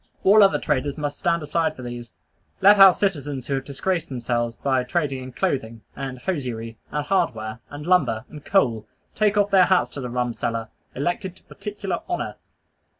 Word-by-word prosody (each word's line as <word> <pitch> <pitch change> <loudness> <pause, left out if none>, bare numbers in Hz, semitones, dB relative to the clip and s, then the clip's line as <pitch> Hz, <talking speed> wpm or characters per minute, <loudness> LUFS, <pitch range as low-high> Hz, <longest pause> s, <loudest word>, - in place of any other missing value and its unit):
All 210 +3 +7
other 195 -1 +5
traders 145 -1 -1
must 145 -1 -3
stand 170 -2 +1
aside 160 +2 0
for 130 - -9
these. 120 -1 -7 0.5
Let 200 +1 +7
our 195 -1 +11
citizens 145 -9 -2
who 140 - -2
have 135 -1 -1
disgraced 165 +5 -2
themselves 120 -2 -2
by 130 -2 0
trading 140 -1 -1
in 130 0 -8
clothing, 115 -3 -2
and 135 -2 -5
hosiery, 125 -7 -4
and 150 0 -2
hardware, 120 - -1
and 145 +1 -8
lumber, 145 -11 +2
and 150 -2 -11
coal, 115 - +1 0.3
take 210 -1 +2
off 205 0 +2
their 190 -2 +6
hats 185 0 +2
to 140 - -6
the 125 - -4
rum 125 0 -1
seller, 115 -1 -3 0.3
elected 175 +6 -2
to - - -19
particular 205 -3 -5
honor. 350 - -3
145 Hz, 180 wpm, -23 LUFS, 125-185 Hz, 0.5 s, our